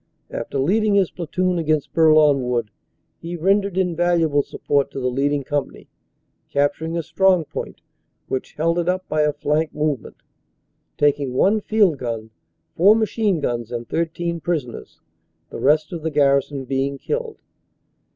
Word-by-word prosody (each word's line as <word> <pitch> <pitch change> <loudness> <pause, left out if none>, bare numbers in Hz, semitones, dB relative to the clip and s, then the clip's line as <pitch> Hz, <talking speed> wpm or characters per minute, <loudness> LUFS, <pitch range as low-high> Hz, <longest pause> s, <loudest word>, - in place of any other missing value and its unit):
After - - -4
leading 205 +9 +2
his 195 -3 +2
platoon 180 +1 -1
against 155 -2 -1
Bourlon 155 -3 +5
Wood, 120 -4 -1 0.5
he 170 +1 -6
rendered 195 +2 +1
invaluable 170 -4 +2
support 140 0 -1
to - - -6
the 125 -1 -1
leading 140 +2 0
company, 145 +1 -4 0.6
capturing 160 +4 0
a 165 - -2
strong 180 +1 +2
point - - -7 0.5
which 130 - -4
held 165 +3 0
it 175 +1 0
up 185 0 -1
by 155 - 0
a 150 0 +3
flank 150 +2 -1
movement, 150 -5 -2 0.8
taking 145 -3 +1
one 210 +9 +3
field 200 -9 +2
gun, 115 -2 -5 0.4
four 200 +5 +6
machine 215 -4 0
guns 120 -4 -2
and 120 -1 -5
13 170 +1 -2
prisoners, 150 -8 -4 0.5
the - - -6
rest 150 +4 +2
of 170 - -5
the 160 - -2
gar 140 -2 +4
rison 135 -1 -7
being 135 +1 -1
killed. 460 - -4
155 Hz, 150 wpm, -21 LUFS, 140-175 Hz, 0.8 s, four